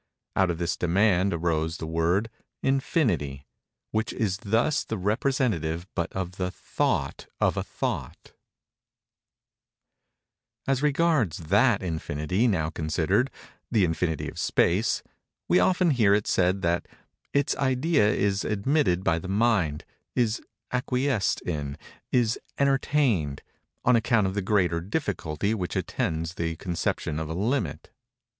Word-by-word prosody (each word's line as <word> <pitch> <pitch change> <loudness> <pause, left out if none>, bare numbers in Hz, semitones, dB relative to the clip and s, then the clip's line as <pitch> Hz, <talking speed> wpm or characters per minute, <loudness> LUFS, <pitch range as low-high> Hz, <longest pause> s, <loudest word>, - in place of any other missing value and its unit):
Out 95 -1 +3
of 85 - -1
this 85 +1 -1
demand 95 +2 +3
arose 80 -1 0
the - - -5
word, 85 +7 0 0.3
"Infinity;" 110 - 0 0.5
which 110 +2 -1
is 100 -5 -1
thus 115 +9 +1
the 110 - -4
representative 100 - 0
but 85 -1 -2
of 95 -1 -4
the 90 -1 -1
thought 90 - -2
of - - +2
a - - 0
thought. - - -5 2.3
As 135 -1 +1
regards 150 - +2
that 105 +1 +4
infinity 80 +5 -1
now 80 -7 0
considered—the 95 - -1
infinity 80 -1 -1
of - - -7
space—we 180 - 0
often 180 -2 +3
hear 110 -7 +4
it 105 - 0
said 95 +1 +1
that 85 +1 0 0.4
"its 140 -1 +1
idea 130 -3 +2
is 100 -1 +1
admitted 105 - +1
by 85 -2 +2
the 90 - -7
mind—is 110 - 0 0.3
acquiesced 125 -3 0
in—is 85 - -2 0.2
entertained—on 130 - 0
account 115 -2 +3
of 95 - -1
the 100 - -1
greater 90 -4 +1
difficulty 100 - -2
which 90 -6 -3
attends 80 +1 -2
the 80 -2 -2
conception 80 -3 -2
of 80 -1 -4
a 80 - -3
limit." 115 +7 -1
100 Hz, 120 wpm, -26 LUFS, 85-120 Hz, 2.3 s, that